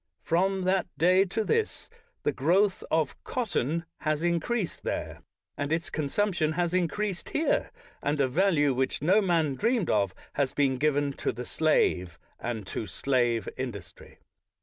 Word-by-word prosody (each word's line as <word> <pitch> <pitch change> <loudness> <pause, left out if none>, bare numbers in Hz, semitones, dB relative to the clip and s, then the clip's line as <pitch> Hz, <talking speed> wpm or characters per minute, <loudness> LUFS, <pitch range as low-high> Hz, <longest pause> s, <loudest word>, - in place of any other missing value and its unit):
From 190 +3 +1
that 185 0 +1
day 185 +3 +5
to 210 +4 -1
this 450 - 0 0.4
the - - +2
growth 180 +9 +2
of 160 -3 0
cotton 170 - -1
has 155 0 -1
increased 175 +4 -1
there, - - -4 0.3
and 145 +1 -3
its 165 +1 -1
consumption 160 +1 0
has 175 +1 0
increased 185 +2 -1
here, 315 - +1 0.3
and 145 +1 0
a 135 - +3
value 145 -1 +3
which 130 +2 -1
no 190 +7 +5
man 165 -7 +2
dreamed 225 - +1
of 100 -3 +1 0.2
has 140 -2 0
been 135 -2 +2
given 145 0 +1
to - - +1
the 125 - -6
slave 90 - +1 0.2
and 115 -4 -4
to 105 - -4
slave 120 -4 0
industry. 120 -8 -7
160 Hz, 150 wpm, -28 LUFS, 135-185 Hz, 0.4 s, day